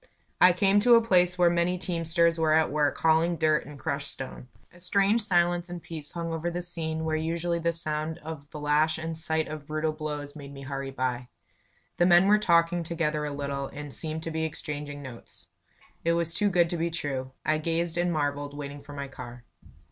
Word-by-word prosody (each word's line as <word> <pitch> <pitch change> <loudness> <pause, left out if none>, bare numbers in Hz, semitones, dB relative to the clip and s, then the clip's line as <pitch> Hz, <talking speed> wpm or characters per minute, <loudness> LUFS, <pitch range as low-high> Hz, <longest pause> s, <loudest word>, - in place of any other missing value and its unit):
I 180 - +9
came 195 +3 +3
to 240 +3 +6
a 230 - +5
place 180 -4 +3
where 175 -1 +5
many 175 +1 +1
teamsters 170 -1 +1
were 155 -1 +3
at 160 -2 +3
work 150 -1 +1
hauling 165 +2 +3
dirt 155 -2 +1
and 150 -1 -10
crushed 140 +1 -3
stone. 130 -1 -7 0.3
A 175 - -17
strange 200 +5 +3
silence 175 -3 +2
and 175 0 -5
peace 155 -3 -7
hung 165 -1 -3
over 165 +1 -2
the 175 +1 -4
scene 160 -2 -2
where 160 0 0
usually 170 +2 -1
the 170 0 +1
sound 155 -1 -2
of 155 -2 -8
the 150 - -8
lash 150 +2 +2
and 160 0 -4
sight 160 0 -1
of 155 -2 -7
brutal 155 +1 -1
blows 150 -2 -5
made 140 -2 -9
me 140 0 -9
hurry 135 0 -4
by. 130 -2 -2 0.7
The 175 - +4
men 175 +1 +6
were 210 +1 +5
talking 170 -3 +3
together 160 -2 -1
a 145 - -3
little, 140 -1 -3
and 145 -1 -8
seemed 160 0 -3
to 165 - -4
be 160 0 -2
exchanging 150 -2 -5
notes. 125 -3 -12 0.6
It 170 - +2
was 170 -1 0
too 205 +3 +2
good 175 -3 +3
to 175 - -1
be 170 +1 0
true. 140 -6 -4
I 155 +1 +2
gazed 165 +1 -1
and 175 0 +1
marvelled, 145 -2 -2
waiting 145 0 -6
for 145 - -11
my 140 -1 -5
car. 120 -2 -10
160 Hz, 210 wpm, -27 LUFS, 145-170 Hz, 0.7 s, I